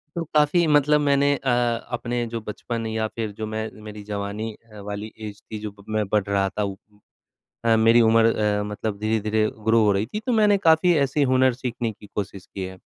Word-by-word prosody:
तो 170 - -2
काफ़ी 150 +3 +4
मतलब 150 0 +4
मैंने 140 0 +3
अ, 135 -1 -3 0.4
अपने 120 0 -2
जो 115 - -1
बचपन 115 +2 -5
या 110 0 -1
फिर 110 -2 -3
जो 110 - -3
मैं 110 0 -3
मेरी 105 -1 -9
जवानी 105 +2 -3 0.2
अ, 105 - -11
वाली 105 +1 -5
एज़ 105 -2 -8
थी, 110 - -8
जब 105 -1 -8
मैं 110 -1 0
बढ़ 105 -1 +2
रहा 100 -1 +1
था 105 - -3
उ 100 -1 -3 0.9
अ, 115 -1 +5
मेरी 115 +2 +5
उम्र 115 0 +4 0.2
अ, - - -1
मतलब 105 0 -4
धीरे-धीरे 110 0 +1 0.2
ग्रो 115 0 +4
हो 105 - +4
रही 100 +2 0
थी, 210 - -5
तो 250 +3 -3
मैंने 210 -2 +4
काफ़ी 160 +2 +5
ऐसे 140 +1 +1
हुनर 130 0 +4
सीखने 120 -2 -3
की 105 0 -15
कोशिश 100 -2 -4
की 95 - -7
है। 95 0 -9
110 Hz, 205 wpm, -23 LUFS, 105-130 Hz, 0.9 s, अ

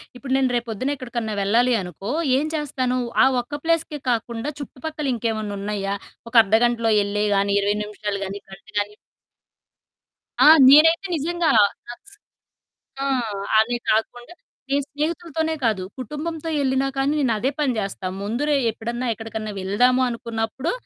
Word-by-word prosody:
ఇప్పుడు 255 +1 -8
నేను 265 -1 +2
రేపు 240 0 -2
పొద్దున 255 +7 -2
ఎక్కడికన్నా 235 -4 -4
వెళ్లాలి 235 +5 +3
అనుకో, 180 +3 -7 0.3
ఏం 290 - 0
చేస్తాను? 260 -4 -1 0.3
ఆ - - +7 0.2
ఒక్క 290 +5 -7
ప్లేస్‌కే 330 -2 0
కాకుండా, 235 +3 -2
చుట్టుపక్కల 300 +2 -5
ఇంకేమన్నా 220 -3 -2
ఉన్నాయా? 200 -1 -2 0.3
ఒక - - -24
అర్థగంటలో 225 +2 +2
ఎల్లేయి 210 +1 -1
గానీ, 200 0 +1
20 205 +1 +1
నిమిషాలు 210 -1 -4
గానీ, 195 +1 -6
గంట 190 +2 -13
గానీ 205 0 -3 1.5
ఆ! - - +8 0.2
నేనైతే 325 +6 +6
నిజంగా, 335 +2 0 1.5
ఆ! - - -1 0.5
అది 240 +2 +2
కాకుండా 240 +7 -2 0.4
నేను 280 0 +2
స్నేహితులతోనే 320 +1 -2
కాదు, 210 -5 +1 0.2
కుటుంబంతో 310 +5 -5
వెళ్లినా 265 -1 +1
కానీ, 270 +2 +1
నేనదే 250 -1 +1
పని 280 -4 +1
చేస్తా. 195 -2 -4 0.2
ముందురోజే 265 +7 0
ఎప్పుడన్నా 235 +3 -4
ఎక్కడికన్నా 220 -1 -6
వెళ్దాము 245 +7 +3
అనుకున్నప్పుడు, 230 +4 -3
240 Hz, 130 wpm, -22 LUFS, 215-285 Hz, 1.5 s, ఆ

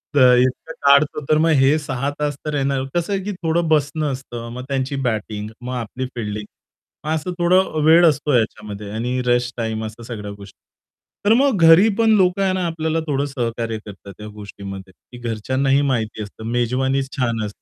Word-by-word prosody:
तर 125 -3 +7
इतकं 130 +6 0
काढतो. 140 +2 +4
तर 155 - +4
मग 165 +1 +3
हे 140 +3 +4
6 140 -2 -3
तास 145 -1 -1
तर 150 -1 -2
येणार. 135 -1 0
कसं 175 +3 0
आहे, 195 -1 -1
की 205 - -3
थोडं 165 +1 +1
बसणं 150 0 +1
असतं, 120 -3 -7
मग 125 - -6
त्यांची 135 0 -1
बॅटिंग, 110 -2 -3
मग 125 +1 -5
आपली 125 +2 -4
फिल्डिंग. 105 -2 -4 0.6
मग 155 - -1
असं 160 +4 -3
थोडं 180 +2 +3
अ, 155 - -1
वेळ 170 +2 +7
असतो 150 0 -1
याच्यामध्ये 105 -3 -2
आणि 125 +3 -1
रेस्ट 120 0 +1
टाईम 110 -1 -2
अशा 110 +2 -9
सगळ्या 105 -3 -6
गोष्टी. 100 -1 -13 0.7
तर 210 - +6
मग 270 -4 +3
घरी 165 +7 +7
पण 225 -1 +4
लोक 180 0 +2
आहे 190 -1 +2
ना, 185 -1 -1
आपल्याला 160 0 -1
थोडं 140 -1 0
सहकार्य 115 -4 -3
करतात 100 -1 -11
ह्या 105 - -8
गोष्टीमध्ये, 100 -2 -9
की 120 - -16
घरच्यांनाही 130 +5 +1
माहिती 115 -6 -1
असतं. 105 +2 -11
मेजवानीच 130 +3 0
छान 115 -4 0
130 Hz, 185 wpm, -20 LUFS, 115-155 Hz, 0.7 s, तर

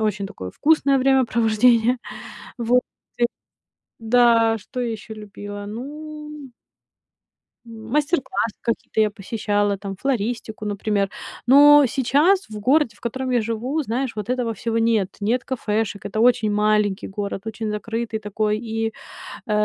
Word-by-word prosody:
очень 210 -2 -1
такое 95 - -8
вкусное 285 -3 +3
времяпровождение. 245 -2 +3 0.6
Вот. 245 +1 +3 0.4
И 240 - +4 0.7
Да, 230 -1 +4
что 250 +4 -6
я 235 - -1
еще 220 +1 -7
любила? 205 -1 -8
Ну 300 +4 -8 1.1
М, 225 -1 -11
мастер-классы 290 - 0
какие-то 230 -1 -1
я 215 - +3
посещала, 205 -1 -1
там 195 0 -6
флористику, 230 -2 -3
например. 205 -1 -1 0.4
Но 290 +3 +8
сейчас 290 - +2
в 215 -1 -7
городе, 255 0 +2
в - - -22
котором 260 +2 -3
я 245 -2 +2
живу, 230 +7 -2
знаешь 250 +2 -2
вот 210 0 -5
этого 250 -2 -1
всего 225 +2 -2
нет. 225 -4 +2
Нет 230 +5 0
кафешек. 215 -5 -2
Это 215 - -3
очень 230 -2 +3
маленький 210 -1 +1
город, 200 -1 -4
очень 220 0 -4
закрытый 225 +1 -3
такой, 210 0 -1
и, 225 -1 -3 0.5
э, 215 - -3
225 Hz, 135 wpm, -22 LUFS, 210-255 Hz, 1.1 s, Но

